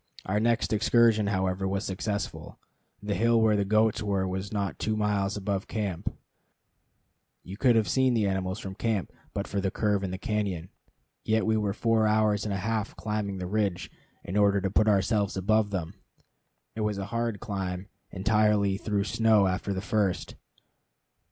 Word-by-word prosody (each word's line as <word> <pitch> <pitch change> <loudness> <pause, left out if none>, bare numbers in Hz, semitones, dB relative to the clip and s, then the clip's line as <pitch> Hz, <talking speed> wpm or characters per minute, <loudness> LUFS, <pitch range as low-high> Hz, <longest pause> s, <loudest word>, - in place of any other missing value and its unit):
Our 105 +3 0
next 115 0 +1
excursion, 115 -1 +4
however, 95 -1 0
was 100 +2 -2
successful. 100 +2 -4 0.5
The 105 0 -1
hill 115 +4 +3
where 110 -1 +4
the 100 - +2
goats 110 +2 +2
were 100 -2 0
was 95 +2 -4
not 100 -6 -2
two 110 0 -1
miles 105 -1 0
above 100 -1 -2
camp, 100 -6 -3 1.3
you 95 - -8
could 120 +2 +3
have 110 -3 +3
seen 130 +5 +2
the 110 -3 +2
animals 95 0 -1
from 95 -2 -6
camp 110 -2 -2 0.2
but - - -3
for 100 0 -2
the 95 - 0
curve 105 -1 0
in 95 - -2
the 95 - -4
cañon, 100 -4 -2 0.5
yet 110 0 +1
we 110 0 +2
were 105 -2 0
four 110 +1 +2
hours 105 -1 +2
and 105 - -2
a - - -1
half 110 0 -2
climbing 100 +1 -3
the 90 - -4
ridge, 100 -2 -1 0.3
in 95 - -6
order 100 -1 +4
to 95 0 -1
put 110 +2 +3
ourselves 100 -1 +2
above 105 +2 +2
them. 90 -5 -4 0.8
It 110 - -3
was 105 -1 -1
a 100 - -3
hard 115 -3 -1
climb, 95 -4 -4 0.2
entirely 100 0 +2
through 100 -1 -1
snow 110 0 +3
after 95 +2 -1
the 95 -1 -2
first. 100 -3 0
100 Hz, 175 wpm, -28 LUFS, 95-110 Hz, 1.3 s, excursion